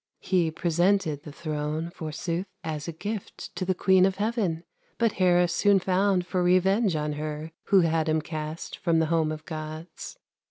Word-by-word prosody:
He 180 -4 +1
presented 170 -1 +1
the 150 - -10
throne, 155 +1 -3
Forsooth, 170 +3 -4 0.2
as 155 -1 -4
a - - -2
gift 205 +5 -6
To 185 +1 -2
the 185 0 +1
queen 190 0 +4
of 190 - -2
heaven; 205 -6 -1 0.3
But 230 -2 +2
Hera 180 -2 +3
soon 200 +4 +3
found 185 0 +1
For 180 0 -1
revenge 185 +2 +3
on 150 0 -1
her 155 +1 -5
Who 195 -2 +5
had 160 -1 +1
him 155 0 +2
cast 155 0 -6
From 170 -2 +2
the 160 - +3
home 160 -2 +2
of 155 0 -7
Gods. 155 +1 -7
170 Hz, 170 wpm, -27 LUFS, 155-185 Hz, 0.3 s, Who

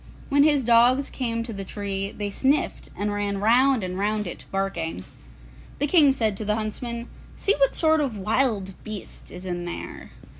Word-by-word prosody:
When 285 0 +4
his 290 -2 +4
dogs 240 +4 +4
came 230 -3 -2
to 230 -1 -6
the 195 -1 -5
tree, 195 0 -3
they 205 -1 -4
sniffed, 275 +8 0
and 205 +2 -1
ran 205 -1 -1
round 245 +3 +4
and 185 0 -4
round 210 +1 0
it, 175 - -7
barking. 175 - -2 0.7
The 290 - +1
King 295 -2 +6
said 220 -6 0
to 215 - -4
the 210 0 +1
huntsmen, 235 +2 -4 0.3
'See 405 - +2
what 275 - +3
sort 315 -1 +3
of 255 -7 -2
a - - -7
wild 210 -2 0
beast 215 -3 -8
is 180 +1 -9
in 175 -1 -3
there. 175 - -7
215 Hz, 185 wpm, -25 LUFS, 195-260 Hz, 0.7 s, King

